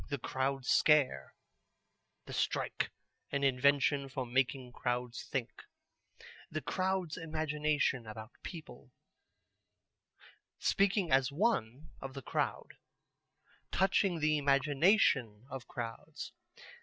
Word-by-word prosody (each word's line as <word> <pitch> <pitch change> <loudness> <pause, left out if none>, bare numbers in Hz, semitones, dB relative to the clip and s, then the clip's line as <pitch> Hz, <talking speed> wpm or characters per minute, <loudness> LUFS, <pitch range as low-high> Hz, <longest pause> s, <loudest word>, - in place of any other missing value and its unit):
The 140 - -1
Crowd 135 0 -2
Scare; 130 - +3 0.9
The - - -8
Strike, - - -1 0.4
an 140 0 0
Invention 140 +1 +3
for 130 -1 -3
making 125 +1 0
Crowds 120 0 -3
Think; 125 -3 -2 1.0
The 155 - -4
Crowd's 185 -3 -1
Imagination 150 -6 0
about 110 +1 -8
People; 150 -8 -9 1.7
Speaking 195 -3 +2
as 130 0 +4
One 145 - 0
of 135 0 -7
the 135 - -6
Crowd; - - -2 0.9
Touching 190 -3 +2
the 155 0 +3
Imagination 140 - +3
of 130 -3 -6
Crowds." 115 -1 -6
140 Hz, 95 wpm, -33 LUFS, 125-155 Hz, 1.7 s, as